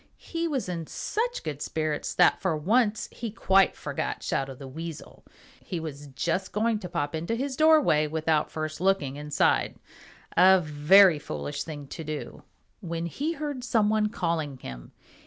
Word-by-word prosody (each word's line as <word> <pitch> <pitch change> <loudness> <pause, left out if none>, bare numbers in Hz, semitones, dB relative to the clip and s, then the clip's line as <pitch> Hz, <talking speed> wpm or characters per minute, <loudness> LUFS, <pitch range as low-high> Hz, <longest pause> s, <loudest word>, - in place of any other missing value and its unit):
He 335 0 -3
was 275 - -2
in 170 -3 -4
such 480 +3 -2
good 145 -2 -5
spirits 155 -1 -2
that 180 - +4
for 180 -4 0
once 215 +6 +1
he 235 - -5
quite 195 -2 +3
forgot - - -4
Shadow 135 0 -2
the 135 +1 -10
Weasel. 160 +3 -8 0.4
He 175 - -4
was 145 -2 -7
just 170 +7 -2
going 220 +1 +1
to 180 -4 -7
pop 145 -1 -2
into 170 +8 -2
his 265 +2 -3
doorway 305 - +4
without 155 0 0
first 155 +1 -5
looking 185 -8 +1
inside, 150 0 +1 0.6
a 190 +2 +7
very 160 +3 +5
foolish 70 - -4
thing 150 -3 -7
to 165 - -6
do, 155 -1 -6 0.4
when 170 -1 -4
he 290 - -2
heard 290 -5 -5
some 225 -4 +2
one 215 -1 +2
calling 165 -8 -2
him. 65 - -9
170 Hz, 160 wpm, -27 LUFS, 150-215 Hz, 0.6 s, a